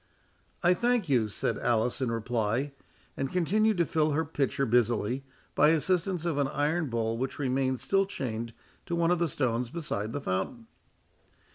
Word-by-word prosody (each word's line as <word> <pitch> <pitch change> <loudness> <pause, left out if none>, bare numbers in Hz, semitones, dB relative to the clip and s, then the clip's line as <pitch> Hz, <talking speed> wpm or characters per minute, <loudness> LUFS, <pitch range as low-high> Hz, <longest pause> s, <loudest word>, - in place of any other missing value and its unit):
"I 175 +1 +6
thank 235 -3 +1
you," 120 -5 +3
said 95 - -2
Alice 120 +2 +1
in 125 -3 0
reply; 115 +3 -1 0.4
and 135 0 -2
continued 205 +5 +2
to 170 - +3
fill 155 -1 +1
her 160 +2 +1
pitcher 140 -2 0
busily, 120 +1 +1 0.3
by 150 - +5
assistance 175 +2 +1
of 160 -4 0
an 140 - +2
iron 150 +2 0
bowl 115 -1 -1
which 130 +1 -3
remained 130 -2 0
still 195 0 +2
chained 115 - -4 0.4
to 170 - -1
one 170 0 +2
of 180 - +2
the 170 -1 +1
stones 125 -3 -1
beside 115 -9 -3
the 145 - -3
fountain. 95 +1 -3
140 Hz, 165 wpm, -29 LUFS, 120-170 Hz, 0.4 s, I